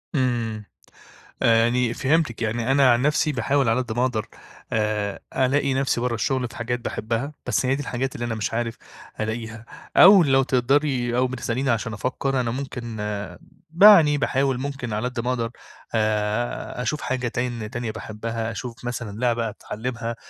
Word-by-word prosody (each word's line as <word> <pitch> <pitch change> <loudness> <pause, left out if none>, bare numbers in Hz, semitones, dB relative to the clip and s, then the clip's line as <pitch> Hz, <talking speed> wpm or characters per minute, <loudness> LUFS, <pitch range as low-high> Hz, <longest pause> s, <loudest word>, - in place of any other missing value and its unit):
إمم، 115 -5 -1 0.8
يعني 115 +1 +3
فهمتِك، 140 -3 0
يعني 115 +2 0
أنا 135 -2 +5
عن 120 +1 +3
نفسي 150 +1 +2
باحاول 135 0 +1
على 115 +3 +2
قد 120 - -6
ما 120 - +1
أقدر 115 -4 -2 0.5
آآ، 105 -2 -1 0.2
ألاقي 135 +1 +2
نفسي 135 -3 0
برّه 125 -2 0
الشغل 125 +3 0
في 115 - -14
حاجات 120 +1 -2
باحبها، 115 +5 -3
بس - - 0
هي 130 - +2
دي 145 - -4
الحاجات 130 -1 -3
اللي 120 - -3
أنا 115 -1 -2
مش 110 0 -3
عارف 115 0 -2 0.4
ألاقيها، 110 +1 -4 0.3
أو 190 -1 +9
لو 135 -2 +3
تقدري 130 -1 +1
أو 130 - +3
بتسأليني 130 +1 -2
عشان 115 -1 0
أفكّر 130 +4 -1
أنا 120 -2 -1
ممكن 120 -4 -5 0.8
يعني 165 -9 +8
باحاول 135 -1 +1
ممكن 135 -4 -4
على 110 +4 -1
قد 125 -1 -5
ما 120 +2 -1
أقدر 115 -2 -1 0.5
آآ، 110 +3 -1
أشوف 150 +4 -2
حاجة 125 -1 -2
تان 120 -2 -3
تانية 120 -1 -4
باحبها 115 +1 -4
أشوف 120 0 -7
مثلًا 115 -4 -4
لعبة 120 -2 +1
أتعلّمها، 115 +2 -5
120 Hz, 165 wpm, -23 LUFS, 115-130 Hz, 0.8 s, أو